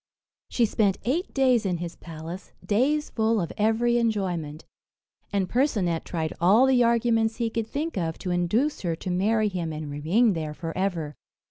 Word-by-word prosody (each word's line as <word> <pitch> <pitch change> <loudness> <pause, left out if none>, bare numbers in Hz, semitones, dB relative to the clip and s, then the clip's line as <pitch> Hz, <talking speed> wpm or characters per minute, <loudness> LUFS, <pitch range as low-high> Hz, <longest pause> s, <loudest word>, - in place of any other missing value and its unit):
She 240 - +2
spent 205 -3 +1
eight 315 +10 -1
days 255 -4 +3
in 185 -3 -1
his 170 0 -6
palace 165 +3 -9
days 280 +8 +1
full 220 0 +1
of 170 -4 -3
every 230 +3 +2
enjoyment; 180 -9 -2 0.7
and 195 -2 0
Percinet 200 - 0
tried 160 -2 -3
all 205 +9 +6
the 260 -2 +4
arguments 230 -1 +2
he 230 -2 -2
could 225 -1 -2
think 300 +5 -3
of 165 -2 -2
to 180 - -4
induce 210 - 0
her 170 -3 -1
to 180 +3 -5
marry 215 +4 +2
him, 175 -5 -3
and 155 -1 -6
remain 185 +11 +2
there 155 -3 -4
for 165 0 -6
ever. 175 -6 -2
200 Hz, 170 wpm, -26 LUFS, 170-235 Hz, 0.7 s, all